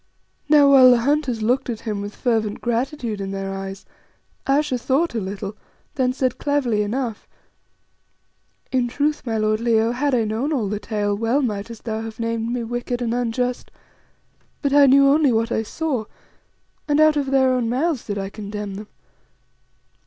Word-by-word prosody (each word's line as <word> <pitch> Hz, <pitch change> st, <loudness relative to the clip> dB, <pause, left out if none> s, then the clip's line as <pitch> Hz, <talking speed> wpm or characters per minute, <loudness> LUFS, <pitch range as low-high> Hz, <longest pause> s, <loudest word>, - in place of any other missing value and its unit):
Now, 290 Hz, -2 st, +6 dB
while 260 Hz, -2 st, +8 dB
the 245 Hz, -2 st, +5 dB
hunters 270 Hz, -4 st, 0 dB
looked 250 Hz, +4 st, +1 dB
at 225 Hz, -2 st, -4 dB
him 210 Hz, -3 st, -3 dB
with 205 Hz, 0 st, -7 dB
fervent 220 Hz, -4 st, -1 dB
gratitude 235 Hz, -2 st, -2 dB
in 195 Hz, -, -4 dB
their 195 Hz, 0 st, -4 dB
eyes, 195 Hz, 0 st, -7 dB, 0.6 s
Ayesha 275 Hz, -2 st, +1 dB
thought 275 Hz, +7 st, 0 dB
a 230 Hz, -, -1 dB
little, 200 Hz, +1 st, -5 dB, 0.4 s
then 255 Hz, -2 st, +1 dB
said 255 Hz, -1 st, -1 dB
cleverly 265 Hz, -7 st, 0 dB
enough 225 Hz, +1 st, -3 dB, 1.4 s
"In 255 Hz, -2 st, +1 dB
truth, 290 Hz, +3 st, -1 dB
my 225 Hz, -1 st, 0 dB
lord 215 Hz, 0 st, +1 dB
Leo, 230 Hz, -1 st, +2 dB
had 265 Hz, +2 st, 0 dB
I 235 Hz, -, +2 dB
known 220 Hz, +7 st, -2 dB
all 235 Hz, -8 st, 0 dB
the 205 Hz, +1 st, -3 dB
tale, 205 Hz, -2 st, -1 dB
well 230 Hz, +7 st, +1 dB
mightest 215 Hz, -1 st, -4 dB
thou 220 Hz, -1 st, -3 dB
have 225 Hz, 0 st, -8 dB
named 230 Hz, 0 st, -2 dB
me 245 Hz, -1 st, -2 dB
wicked 240 Hz, +1 st, -3 dB
and 235 Hz, -2 st, -1 dB
unjust; 245 Hz, +1 st, -2 dB, 0.9 s
but 280 Hz, -1 st, +1 dB
I 285 Hz, -1 st, +7 dB
knew 275 Hz, +1 st, +6 dB
only 285 Hz, -1 st, +4 dB
what 225 Hz, 0 st, 0 dB
I -, -, +1 dB
saw, 260 Hz, 0 st, -3 dB, 0.8 s
and 295 Hz, 0 st, +2 dB
out 310 Hz, 0 st, +5 dB
of 285 Hz, -2 st, -1 dB
their 265 Hz, -1 st, +3 dB
own 245 Hz, -3 st, 0 dB
mouths 275 Hz, +2 st, 0 dB
did 205 Hz, -2 st, -3 dB
I 195 Hz, 0 st, -4 dB
condemn 210 Hz, -1 st, -6 dB
them. 205 Hz, +2 st, -8 dB
235 Hz, 175 wpm, -22 LUFS, 215-270 Hz, 1.4 s, while